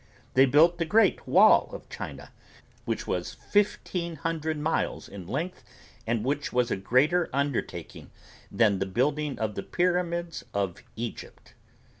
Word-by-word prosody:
They 135 +1 +6
built 165 +6 +5
the 165 - +1
Great 220 +7 +3
Wall - - +6
of - - -9
China - - -8 0.5
which - - -2
was - - -3
fifteen 180 -4 -1
hundred 160 0 -2
miles 155 +2 -1
in 95 -4 -10
length 175 - -4 0.4
and 115 -1 0
which 145 +2 -1
was 125 -1 +1
a - - +2
greater 140 - +2
undertaking 140 -1 -3 0.4
than 105 -4 +3
the 95 - -1
building 140 +8 0
of 110 -1 -2
the 100 - -4
Pyramids 175 - -1
of 100 0 -2
Egypt. 115 +1 -7
145 Hz, 140 wpm, -27 LUFS, 115-170 Hz, 0.5 s, They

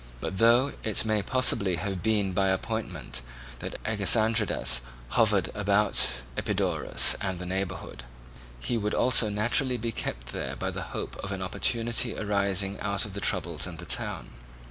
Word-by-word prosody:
But 95 - -4
though 120 +4 +5
it 110 0 0
may 110 -1 +1
possibly 100 -6 +2
have 95 +1 -3
been 105 -2 +1
by 95 +1 +2
appointment 95 - -3 0.4
that - - -6
Agesandridas 110 - +2 0.3
hovered 105 - +2
about 105 -4 +2 0.3
Epidaurus - - +2
and 95 -1 -2
the 90 - -6
neighbourhood, 95 -9 -4 0.6
he 115 - -1
would 105 0 -1
also 120 -3 +4
naturally 120 +5 +1
be 115 0 -3
kept - - -5
there - - -4
by - - -3
the - - -5 0.2
hope - - -5
of 95 - -5
an 95 -1 -3
opportunity 115 +4 0
arising 100 -1 0
out 100 0 0
of 105 - -8
the 100 - -4
troubles 85 -5 0
in 90 -2 -8
the 85 - -7
town. - - -1
100 Hz, 155 wpm, -27 LUFS, 95-110 Hz, 0.6 s, though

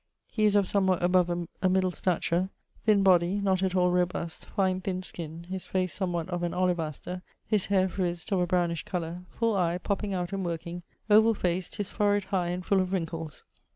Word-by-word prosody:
He 215 - +1
is 210 -1 +4
of 200 -2 +4
somewhat 190 -3 +2
above 180 0 +4 0.3
a 185 - +3
middle 185 0 +2
stature, 180 0 0 0.4
thin 210 -3 +4
body, 180 -1 +4
not 195 -2 +1
at 190 -1 0
all 180 -1 +3
robust: 180 -2 -1
fine 190 -2 0
thin 185 0 -3
skin, 165 -2 -7
his 185 +1 -6
face 185 -1 -1
somewhat 175 -4 -2
of 175 -1 -2
an 175 -1 -1
olivaster; 180 -1 -1 0.2
his 210 -3 +1
hayre 190 -1 +3
frizzd, 175 0 -3
of 195 - +2
a 180 - +1
brownish 175 -2 +1
colour; 175 -1 -4
full 230 -2 0
eye, 175 -2 +1
popping 200 +1 -2
out 180 0 -3
and 195 -1 -2
working: 170 0 -4 0.3
ovall 220 +1 +5
faced, 180 0 -1
his 205 -2 -3
forehead 205 -1 +2
high 180 -2 +2
and 180 +1 -3
full 195 -2 +3
of 185 0 -2
wrinckles. 165 -4 -4
185 Hz, 195 wpm, -28 LUFS, 175-195 Hz, 0.4 s, ovall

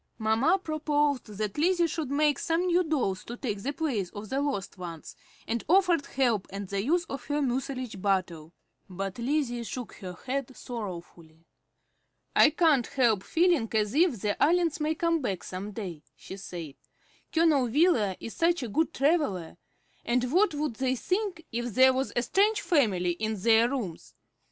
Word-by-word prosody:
Mamma 225 - +2
proposed 295 -5 0
that 210 +3 -4
Lizzie 350 +2 +3
should 320 -3 -3
make 295 +1 +2
some 330 +2 0
new 360 0 +3
dolls 260 - -1
to 240 - -7
take 210 -7 -3
the 275 - -2
place 270 - -2
of 205 0 -7
the 270 +1 0
lost 200 -10 -3
ones, 170 -3 -8 0.3
and 235 0 -2
offered 360 -4 +3
help 235 -7 0
and 195 0 -6
the 200 0 -1
use 340 +7 +1
of 275 -5 -7
her 290 0 -1
mucilage 255 -5 -3
bottle; 180 -5 -1 0.4
but 195 +3 -5
Lizzie 245 -2 -1
shook 245 0 -6
her 185 -3 -7
head 265 0 -3
sorrowfully. 170 -7 -8 0.9
"I - - +7
can't 305 -6 +3
help 235 -8 +2
feeling 330 - +2
as 210 -1 +1
if 310 - +3
the 205 +1 -2
Allens 335 0 +3
may 310 +1 0
come 335 0 +1
back 195 -8 -3
some 190 +3 -6
day," 185 -7 -6
she - - -9
said. 175 -6 -7 0.6
"Colonel 315 -6 +3
Wheeler 235 - +3
is 225 - -7
such 335 -3 +1
a - - -3
good 320 +8 0
traveller; 275 - +1 0.5
and 245 +1 0
what 365 -3 +3
would 290 -6 -2
they 260 -1 0
think 370 - -2
if 240 -2 -3
there 260 0 +6
was 265 +1 -1
a 240 - +1
strange 415 - +2
family 205 - +2
in 215 +4 -3
their 230 +3 +4
rooms? 225 -12 -5
255 Hz, 170 wpm, -28 LUFS, 205-310 Hz, 0.9 s, I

